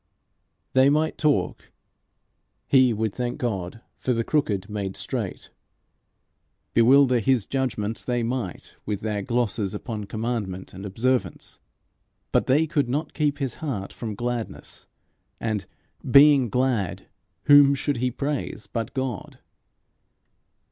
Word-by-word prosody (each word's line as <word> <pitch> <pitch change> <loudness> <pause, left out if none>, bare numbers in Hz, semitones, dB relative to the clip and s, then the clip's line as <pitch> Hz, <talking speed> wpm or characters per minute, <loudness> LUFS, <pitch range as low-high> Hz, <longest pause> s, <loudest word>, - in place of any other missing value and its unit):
They 130 +1 +5
might 155 +2 +1
talk; 150 -2 0 1.0
he 130 -2 +5
would 110 -2 -1
thank 125 -1 -3
God 105 -3 -3 0.2
for 125 - 0
the 115 0 0
crooked 105 -10 0
made 100 -3 -4
straight. - - -5 1.2
Bewilder 130 +2 +5
his 115 -1 +2
judgment 115 -5 -2
they 120 -1 0
might 115 -6 -4
with 105 -1 -3
their 105 -2 -2
glosses 110 -3 -1
upon 105 -1 -5
commandment 105 -3 -4
and 95 +2 -7
observance; 125 +6 -2 0.7
but - - +2
they 150 +5 +4
could 145 -5 0
not 145 +4 -2
keep 145 -2 0
his 135 -5 -2
heart 120 -11 -4
from 110 -3 -5
gladness; 120 0 -5 0.5
and, 110 -3 -2 0.4
being 140 -2 +7
glad, 110 -6 0 0.4
whom 145 -1 +7
should 140 0 -1
he 125 +2 0
praise 140 -4 -3
but 115 +2 -5
God? 130 -7 -4
120 Hz, 120 wpm, -25 LUFS, 105-135 Hz, 1.2 s, being